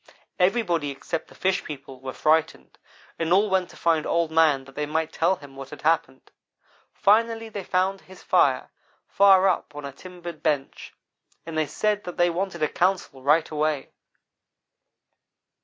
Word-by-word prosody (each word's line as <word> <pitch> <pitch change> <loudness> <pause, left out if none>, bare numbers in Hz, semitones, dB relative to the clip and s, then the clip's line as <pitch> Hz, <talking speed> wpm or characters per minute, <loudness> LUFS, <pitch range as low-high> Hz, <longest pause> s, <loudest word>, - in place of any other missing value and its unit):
Everybody 180 -6 +1
except 140 +4 -5
the - - -17
fish 190 0 0
people 135 -3 -9
were 130 0 -6
frightened 160 +3 0 0.4
and 165 0 -1
all 200 +2 +4
went 185 -2 +1
to - - -15
find 165 -2 +1
Old 170 -1 +1
man 155 -4 +3
that 135 - -15
they 150 +1 -3
might 160 +1 -2
tell 175 +4 +2
him 145 -5 -14
what 135 0 -9
had 150 - -11
happened. 150 -4 0 0.6
Finally 225 +2 +2
they 205 -2 -6
found 190 +2 0
his 190 0 -15
fire, - - +2 0.4
far 195 -1 +5
up 150 - -1
on 145 -1 -7
a 140 - -6
timbered 175 +2 -10
bench, 145 -4 -2 0.5
and 165 -1 -7
they 155 -1 +1
said 210 +3 -1
that 180 - -7
they 175 0 +3
wanted 175 -2 -3
a - - +4
council 175 -6 -1
right 150 +4 +3
away. 150 -2 -1
165 Hz, 165 wpm, -25 LUFS, 150-190 Hz, 0.6 s, far